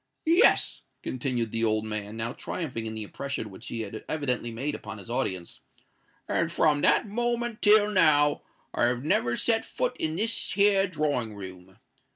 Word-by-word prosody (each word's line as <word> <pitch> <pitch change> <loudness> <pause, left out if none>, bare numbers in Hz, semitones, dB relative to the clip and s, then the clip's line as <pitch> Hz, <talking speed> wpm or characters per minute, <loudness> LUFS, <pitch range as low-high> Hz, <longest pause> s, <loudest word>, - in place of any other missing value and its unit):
"Yes," 340 +8 +3 0.2
continued 120 -3 -2
the 115 0 0
old 110 -1 +1
man, 105 0 -3
now 115 +2 -2
triumphing 125 -10 -4
in 110 - -5
the 110 - -4
impression 125 0 -6
which 110 +6 -11
he 115 - -4
had 110 0 -7
evidently 125 -6 -1
made 130 +6 -4
upon 110 -4 -8
his 105 +3 -10
audience; 95 -7 -3 0.7
"and 170 0 0
from 150 -3 +2
that 150 +7 +4
moment 240 +1 -2
till 210 0 +5
now 150 -6 +5 0.3
I've 120 +1 +1
never 120 -5 +1
set 225 -1 +2
foot - - -3
in 160 0 -2
this 225 +5 0
here 200 -1 +3
drawing 145 - -2
room. 95 -1 -11
130 Hz, 165 wpm, -27 LUFS, 110-185 Hz, 0.7 s, till